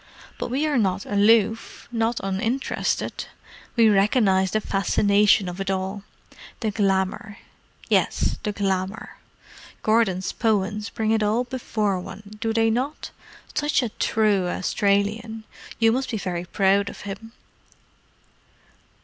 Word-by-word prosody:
But - - -3
we 270 +5 0
are 295 -5 +1
not 195 -2 0
aloof—not 225 +2 +1
uninterested. 225 +7 -2 0.5
We 230 -2 +5
recognize 195 -2 +3
the 215 - 0
fascination 200 0 +3
of 180 +2 -5
it 195 - -3
all. 190 +1 -2 0.6
The 220 -3 0
glamour—yes, 200 0 -1
the 210 - -2
glamour. 195 +1 -3 0.7
Gordon's 215 -4 +2
poems 210 -1 0
bring 220 -1 -1
it 225 -1 +2
all 215 +4 +2
before 220 -6 -2
one, 200 +3 -10
do 225 - 0
they 225 0 +2
not? 260 +6 -3 0.4
Such 295 -2 +1
a 240 - -1
true 210 -4 +1
Australian! 205 +4 0 0.3
You 225 -1 +4
must 255 +2 -1
be 225 - -2
very 180 -3 -3
proud 200 +2 +2
of - - -10
him." 205 +3 -8
210 Hz, 120 wpm, -24 LUFS, 195-225 Hz, 0.7 s, We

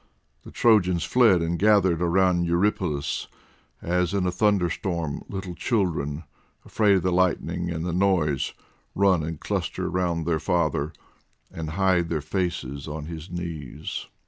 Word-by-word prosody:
The - - -12
Trojans 90 -7 +3
fled, 110 -9 +4
and 85 +1 -1
gathered 100 -5 +4
round 90 0 +2
Eurypylus, 85 -4 0 0.6
as 90 +2 0
in 95 -2 +1
a 90 - +1
thunderstorm 90 -5 0
little 95 -2 -5
children, 85 - -1 0.4
afraid 105 -3 +3
of 95 - +1
the 90 - +1
lightning 90 -1 0
and 80 -1 -3
the 90 - -2
noise, 85 -7 +1 0.4
run 95 -3 +3
and 80 0 -5
cluster - - -3
round 85 -2 -1
their 80 -1 +1
father, 80 -3 0 0.6
and 80 -2 -5
hide 95 -3 +2
their 80 - 0
faces 75 -4 -3
on 75 0 -5
his 80 +1 -8
knees. 85 -6 -6
85 Hz, 140 wpm, -25 LUFS, 80-95 Hz, 0.6 s, fled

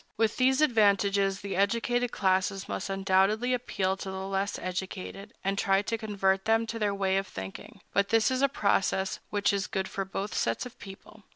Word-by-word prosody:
With 225 0 +1
these 265 +2 +3
advantages, 200 -6 +3
the 200 -1 -4
educated 235 +5 +1
classes 190 0 0
must - - -4
undoubtedly 195 +5 +2
appeal 195 -6 -1
to 195 - -6
the 190 0 -5
less 195 +1 -1
educated, 190 +2 -5
and 195 +1 0
try 195 0 +2
to 230 - -1
convert 195 -3 0
them 225 +1 +3
to 230 0 -5
their 210 -2 +1
way 195 -1 +1
of 195 0 -1
thinking; 95 0 -9
but 200 0 +2
this 225 +1 +3
is 260 0 0
a 275 - +4
process 195 -5 +1
which 205 0 +1
is 200 0 -1
good 190 -3 -2
for 195 - -3
both 195 +2 -4
sets 115 - -1
of 245 0 -11
people. 195 +2 -12
200 Hz, 190 wpm, -29 LUFS, 195-225 Hz, -, a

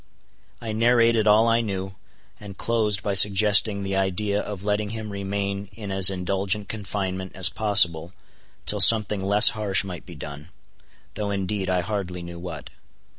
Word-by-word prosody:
I 115 -2 -7
narrated 115 0 +1
all 110 +2 +3
I 115 0 +1
knew, 95 -3 -6 0.5
and 100 -2 -12
closed 110 -4 -1
by 100 - -2
suggesting 100 +1 +4
the 95 0 -4
idea 100 +2 -2
of 100 -2 -9
letting 105 0 -2
him 110 -1 -7
remain 100 0 -5
in 105 -1 -9
as 95 -1 +6
indulgent 95 +2 -3
confinement 95 -3 -6
as 95 0 +3
possible 90 -6 +2 0.5
till - - 0
something 105 -3 +6
less 100 +3 +6
harsh 105 -4 -1
might 90 -3 -10
be - - -12
done—though 90 +6 -11
indeed 100 0 -4
I 90 -1 0
hardly 90 -3 -6
knew 85 0 -10
what. 90 +1 -9
100 Hz, 150 wpm, -22 LUFS, 95-105 Hz, 0.5 s, as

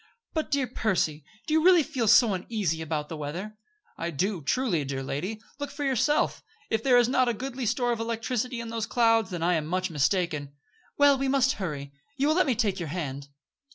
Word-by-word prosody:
"But, 315 -2 -2
dear 280 -2 +1
Percy, 175 - -1 0.2
do 305 - -2
you 315 0 +3
really 355 -2 +6
feel 245 -5 -2
so 215 0 +6
uneasy 185 -4 -2
about 155 -2 -3
the 165 - -6
weather?" 170 +8 -5 0.4
"I 170 - -2
do, 180 +3 -1
truly, 170 - 0
dear 135 -1 -4
lady. 180 +11 -4 0.2
Look 285 - -3
for 290 +1 -6
yourself. 270 +2 +1 0.3
If 220 - +1
there 250 0 +4
is 240 -1 +5
not 255 -1 +2
a 235 - -1
goodly 255 +1 -4
store 245 +2 +1
of 235 - -2
electricity 235 +2 -2
in 230 -1 -5
those 225 -1 -3
clouds, 225 -4 +3
then 175 -3 -4
I 180 +1 +3
am 155 -3 -1
much 185 +1 -1
mistaken." 150 -1 0 0.4
"Well, 285 -1 +5
we 270 - 0
must 270 0 +3
hurry. 140 -6 -4 0.2
You 280 +1 +2
will 310 - +3
let 365 -3 +3
me 255 - +2
take 205 -5 0
your 170 -3 -4
hand." 140 -4 -4
215 Hz, 210 wpm, -27 LUFS, 165-255 Hz, 0.4 s, really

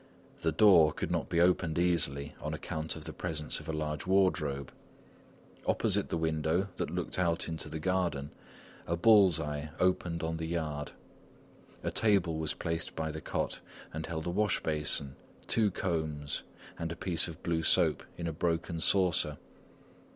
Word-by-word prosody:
The 80 - +1
door 80 -3 +6
could - - -3
not - - -1
be 85 - +1
opened 85 -2 +3
easily 75 -5 +1
on - - -3
account 80 0 -4
of 80 - -8
the 80 - -6
presence 75 0 -2
of - - -10
a - - +1
large 75 +1 -3
wardrobe. 80 -8 +1 1.0
Opposite - - +2
the - - -1
window 80 +4 0
that - - -2
looked - - -3
out 85 -2 +1
into 80 -1 -5
the 80 - -4
garden, 85 -4 -1 0.6
a 85 - +1
bull's 95 -4 +6
eye 75 -1 -3
opened 90 -2 +1
on 80 0 -1
the 80 0 -3
yard; 75 -3 -3 0.9
a - - -1
table 95 -7 +2
was 80 -1 -2
placed 80 0 -3
by 80 -1 -2
the 80 +1 -6
cot - - -2 0.3
and 80 +1 -4
held 80 -1 -4
a 85 - -1
washbasin, 75 -8 0 0.3
two 110 -2 +3
combs, 80 -6 -2 0.4
and 85 0 -3
a - - -4
piece 85 -2 +1
of 80 - -10
blue 85 -2 0
soap - - +4 0.2
in 85 - -4
a 85 - -2
broken 85 +1 -1
saucer. 85 -6 +3
80 Hz, 165 wpm, -31 LUFS, 75-90 Hz, 1.0 s, door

